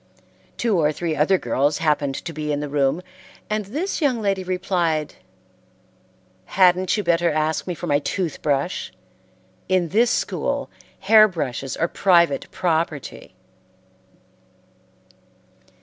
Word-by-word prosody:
Two 220 -6 +1
or 150 -1 +2
three 160 +1 -3
other 165 +6 +3
girls 145 -2 0
happened 145 -3 0
to 165 - -6
be 150 -1 -3
in 145 - -1
the 150 - -4
room, 145 +4 0 0.5
and 215 -1 -1
this 310 - -3
young 265 -6 +1
lady 195 -3 -1
replied, 180 -4 -1 1.3
"Hadn't 185 - +3
you 210 - -1
better 170 -1 +2
ask 155 +2 -1
me 180 - -3
for 175 - -6
my 145 -3 +2
tooth 165 +1 -3
brush? 145 +4 -1 0.8
In 185 -3 +1
this 230 +6 +3
school, - - -2 0.3
hair 215 +2 +7
brushes 135 - -4
are 170 - +1
private 170 -6 +2
property." 160 -4 -3
170 Hz, 125 wpm, -22 LUFS, 150-190 Hz, 1.3 s, hair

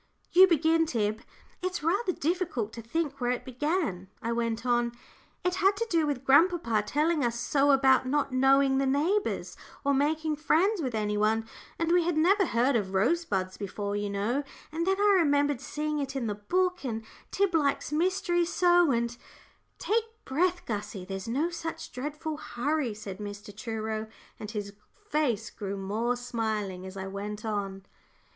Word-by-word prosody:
"You 375 +2 +8
begin, 325 -1 +3
Tib. 215 -4 -1 0.4
It's 365 -4 -3
rather 375 +5 +1
difficult 320 - -2
to 230 - -7
think 280 +3 -3
where 245 - +1
it 250 - -2
began," 260 - -2
I 230 - -3
went 230 0 -1
on. 240 -1 +2 0.5
"It 360 0 +1
had 390 +1 +4
to 460 - 0
do 325 -3 +3
with 275 -3 -2
grandpapa 280 - +4
telling 305 +1 +1
us 235 -1 0
so 280 +3 +2
about 265 -2 +5
not 285 +1 0
knowing 270 +1 +4
the 275 - +1
neighbours, 325 +10 0 0.3
or 280 - +3
making 305 +2 +1
friends 345 +6 +2
with 255 -6 -2
any 210 -1 0
one, 220 +1 +1 0.3
and 330 0 0
we 350 0 +4
had 340 -1 0
never 380 +4 +4
heard 245 +3 +2
of 195 -4 -1
Rosebuds 195 - +1
before, 200 0 -4
you 205 0 -2
know, 205 +7 0 0.3
and 335 +3 -2
then 385 +1 +2
I 405 -1 +5
remembered 285 -4 +2
seeing 300 0 -2
it 275 -1 -3
in 265 -3 -1
the 210 - -1
book, 360 - 0
and 225 -4 -3 0.2
Tib 395 -2 +1
likes 290 -3 +1
mysteries 350 +1 +1
so, 350 -1 +4
and 235 -1 0 0.3
" - - -38
"Take 450 +1 +1 0.2
breath, 355 +6 0
Gussie, 205 -3 -4
there's 195 +1 -5
no 290 +9 0
such 325 -1 -6
dreadful 300 +4 -4
hurry," 255 -2 -2
said 205 -2 -8
Mr. 205 0 -8
Truro, 220 0 -3 0.3
and 210 - -6
his 205 -2 -5 0.4
face 240 -8 0
grew 200 -1 -5
more 215 +5 -1
smiling 220 -6 -3
as 190 +1 -9
I 190 - -4
went 205 +2 -5
on. 195 -3 -3
270 Hz, 170 wpm, -28 LUFS, 215-325 Hz, 0.5 s, You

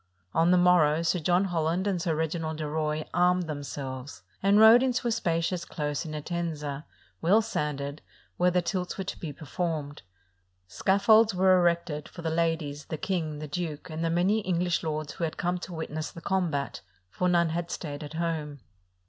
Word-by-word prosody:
On 165 +1 +3
the 180 - +5
morrow 170 -3 +4
Sir 175 +2 +1
John 175 +4 +2
Holland 175 0 0
and 190 -4 0
Sir 165 -3 0
Reginald 160 0 -2
de 155 -1 -3
Roye 155 0 -1
armed 180 +1 +3
themselves, 140 -3 -6 0.2
and 200 +2 +4
rode 220 +2 +9
into 255 -2 0
a - - +1
spacious 170 -4 0
close 150 -2 -3
in 155 - -6
Entenga, 150 -3 -4 0.4
well 190 +7 +5
sanded, 150 -8 -3 0.4
where 180 +1 +4
the 180 0 +1
tilts 180 0 -2
were 195 - -2
to 190 - -6
be 160 - -5
performed. 150 0 -4 0.7
Scaffolds 205 - +4
were 185 0 +5
erected 170 -4 +1
for 170 - -10
the 160 - -1
ladies, 160 -3 -1
the 160 - -4
king, 160 -3 -2
the 155 +1 -6
duke, 160 0 -4
and 160 +1 -3
the 165 - +1
many 185 +6 +2
EngHsh 180 -2 0
lords 155 -1 -3
who 175 - -5
had 160 - -2
come 180 +1 -1
to 185 - -8
witness 155 -1 -4
the - - -10
combat; 170 -6 -1 0.3
for 180 - 0
none 170 -1 +3
had 170 +1 -3
stayed 145 -3 -5
at 150 - -8
home. 155 -4 -3
165 Hz, 180 wpm, -28 LUFS, 150-180 Hz, 0.7 s, rode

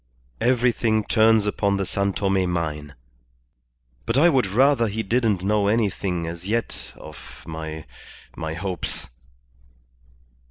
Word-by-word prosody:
"Everything 120 -3 +2
turns 110 -1 +4
upon 100 -1 0
the 100 - -1
San 100 +2 0
Tome 95 -2 0
mine, 75 -3 -3 1.1
but 125 - +1
I 165 +5 +6
would 130 -9 +2
rather 120 +4 +3
he 110 +2 -3
didn't 110 -4 +1
know 105 0 +2
anything 100 -5 0
as 85 +2 -6
yet 115 +2 -2
of 75 -3 -12
my 80 -1 -6 0.5
my 80 0 -4
hopes." 90 -6 -4
100 Hz, 120 wpm, -23 LUFS, 85-115 Hz, 1.1 s, I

